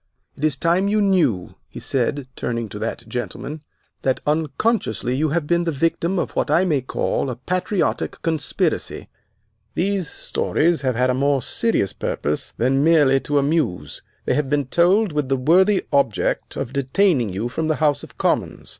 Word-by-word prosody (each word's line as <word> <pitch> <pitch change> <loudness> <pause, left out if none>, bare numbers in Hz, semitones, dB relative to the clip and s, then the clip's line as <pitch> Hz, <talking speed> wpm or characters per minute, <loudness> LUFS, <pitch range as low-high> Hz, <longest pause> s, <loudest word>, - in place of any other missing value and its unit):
It 145 - -10
is 155 -3 +2
time 175 +6 +2
you 210 +1 +2
knew," 165 - +2
he - - -9
said, 135 +1 -1
turning 115 -2 -3
to 105 - -7
that 115 +1 -4
gentleman, 125 +6 -5 0.4
"that 130 -1 0
unconsciously 150 - 0
you 155 +3 +1
have 160 +1 0
been 170 +2 +1
the 170 - 0
victim 165 +5 0
of - - -1
what - - -1
I 180 - +4
may 150 -7 +1
call 130 +1 -1
a 125 - -3
patriotic 185 - -1
conspiracy. 160 -3 -1 0.7
These 190 -3 0
stories 165 -2 0
have 130 -3 0
had 125 +2 +2
a - - 0
more 135 0 +1
serious 225 - 0
purpose 75 +1 -3
than 135 +3 +2
merely 150 -4 +5
to 145 +2 -1
amuse. 140 - 0 0.2
They - - +1
have 145 -2 0
been 145 -1 +1
told 180 - +3
with 150 -3 -1
the 135 - +2
worthy 185 +9 +3
object 140 -7 0
of 120 - -4
detaining 140 - +2
you 100 +5 -3
from 155 +6 -2
the 155 - +1
House 150 -2 +1
of - - -13
Commons. - - -1
145 Hz, 170 wpm, -21 LUFS, 130-170 Hz, 0.7 s, merely